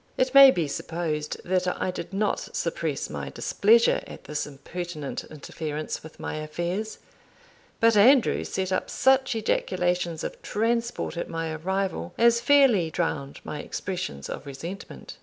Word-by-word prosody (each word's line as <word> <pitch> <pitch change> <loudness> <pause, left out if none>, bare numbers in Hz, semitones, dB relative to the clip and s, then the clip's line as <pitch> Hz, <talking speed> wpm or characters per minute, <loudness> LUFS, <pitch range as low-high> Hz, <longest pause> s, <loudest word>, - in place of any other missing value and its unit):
It 255 0 +1
may 275 -1 +11
be 170 - +1
supposed 155 0 -3
that 185 0 +1
I 185 - 0
did 180 - -7
not 205 +2 -1
suppress - - -2
my - - -5
displeasure 230 +3 +3
at - - -10
this 150 -1 -3
impertinent 150 +1 -6
interference 155 0 -5
with 160 - -13
my - - -4
affairs; 175 +8 -3 0.8
but 230 -1 +5
Andrew 240 +4 +5
set 190 0 -3
up 185 - -1
such 265 -1 +3
ejaculations 180 -6 0
of - - -6
transport 230 -2 -1
at - - -3
my 165 -1 -3
arrival, 185 - -2
as 235 0 +4
fairly 245 - +5
drowned 145 -4 -3
my 150 - -5
expressions 110 - -5
of 145 - -7
resentment. 170 +8 -8
180 Hz, 140 wpm, -26 LUFS, 155-225 Hz, 0.8 s, may